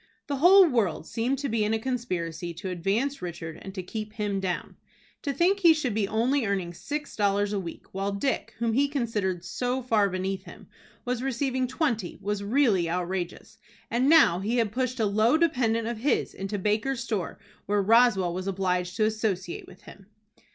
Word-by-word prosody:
The 285 Hz, -3 st, -2 dB
whole 370 Hz, +6 st, +8 dB
world 220 Hz, -, 0 dB
seemed 245 Hz, +7 st, -1 dB
to 280 Hz, +1 st, -3 dB
be 225 Hz, -3 st, 0 dB
in 215 Hz, +1 st, +1 dB
a -, -, -1 dB
conspiracy 180 Hz, -9 st, -3 dB
to 185 Hz, +2 st, -5 dB
advance 205 Hz, +11 st, -1 dB
Richard, 165 Hz, -2 st, -6 dB
and 195 Hz, -, -7 dB
to 185 Hz, -, -4 dB
keep 215 Hz, +3 st, -6 dB
him 205 Hz, -3 st, -2 dB
down. 185 Hz, -2 st, -3 dB, 0.5 s
To 285 Hz, -, -2 dB
think 350 Hz, +8 st, +2 dB
he 335 Hz, -4 st, +6 dB
should 270 Hz, -7 st, -1 dB
be 210 Hz, -2 st, 0 dB
only 240 Hz, +6 st, +1 dB
earning 190 Hz, -4 st, -1 dB
six 295 Hz, -, -5 dB
dollars 205 Hz, 0 st, +1 dB
a 200 Hz, -, 0 dB
week, 170 Hz, -3 st, -8 dB
while 195 Hz, +1 st, -2 dB
Dick, 230 Hz, +1 st, -2 dB
whom 230 Hz, 0 st, 0 dB
he 280 Hz, +4 st, +3 dB
considered 210 Hz, -, -2 dB
so 250 Hz, +6 st, -2 dB
far 215 Hz, -5 st, +2 dB
beneath 190 Hz, +1 st, -3 dB
him, -, -, -12 dB, 0.4 s
was 245 Hz, -1 st, -1 dB
receiving 260 Hz, 0 st, -1 dB
twenty, 245 Hz, -, -1 dB
was 205 Hz, 0 st, -2 dB
really 205 Hz, -, +2 dB
outrageous. 180 Hz, +5 st, -4 dB, 0.3 s
And 250 Hz, +4 st, +2 dB
now 295 Hz, -, +6 dB
he 220 Hz, +6 st, -1 dB
had 225 Hz, -4 st, +1 dB
pushed 255 Hz, +1 st, -2 dB
a 220 Hz, -, +3 dB
low 215 Hz, +7 st, +3 dB
dependent 240 Hz, -9 st, +1 dB
of 235 Hz, -2 st, -3 dB
his 280 Hz, +6 st, 0 dB
into 195 Hz, +2 st, -4 dB
Baker's 215 Hz, +6 st, 0 dB
store 210 Hz, -8 st, -3 dB, 0.3 s
where 205 Hz, 0 st, +2 dB
Roswell 215 Hz, -5 st, +4 dB
was 185 Hz, +2 st, -4 dB
obliged 180 Hz, -2 st, -1 dB
to 215 Hz, -, +2 dB
associate 215 Hz, -5 st, -2 dB
with 185 Hz, +2 st, -16 dB
him! 195 Hz, -1 st, -14 dB
215 Hz, 185 wpm, -27 LUFS, 190-250 Hz, 0.5 s, whole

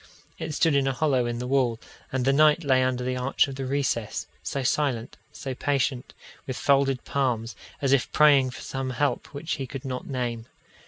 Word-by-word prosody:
It 155 Hz, -, -4 dB
stood 160 Hz, -2 st, +3 dB
in 140 Hz, -1 st, +2 dB
a 135 Hz, -, +1 dB
hollow 130 Hz, -3 st, +1 dB
in 120 Hz, 0 st, -2 dB
the 125 Hz, -, -4 dB
wall, 125 Hz, -3 st, +1 dB, 0.3 s
and 130 Hz, -1 st, -1 dB
the 135 Hz, -, +4 dB
knight 155 Hz, +3 st, +5 dB
lay 130 Hz, -3 st, +3 dB
under 130 Hz, -1 st, 0 dB
the 130 Hz, 0 st, -1 dB
arch 125 Hz, +3 st, +2 dB
of 135 Hz, -, -6 dB
the 135 Hz, 0 st, -4 dB
recess, 130 Hz, -5 st, -1 dB, 0.2 s
so 140 Hz, -, -3 dB
silent, 130 Hz, -3 st, 0 dB, 0.2 s
so 135 Hz, -3 st, -5 dB
patient, 135 Hz, -1 st, -1 dB, 0.3 s
with 130 Hz, -1 st, -3 dB
folded 135 Hz, -2 st, +2 dB
palms, 120 Hz, -5 st, -1 dB, 0.3 s
as 135 Hz, -1 st, +3 dB
if 140 Hz, -, +2 dB
praying 145 Hz, -4 st, +5 dB
for 125 Hz, -, -9 dB
some 135 Hz, -1 st, -4 dB
help 140 Hz, +3 st, -1 dB
which 145 Hz, +5 st, -4 dB
he 135 Hz, -, -4 dB
could 130 Hz, +2 st, -7 dB
not 130 Hz, -1 st, -4 dB
name. 120 Hz, -4 st, -3 dB
135 Hz, 200 wpm, -26 LUFS, 125-140 Hz, 0.3 s, knight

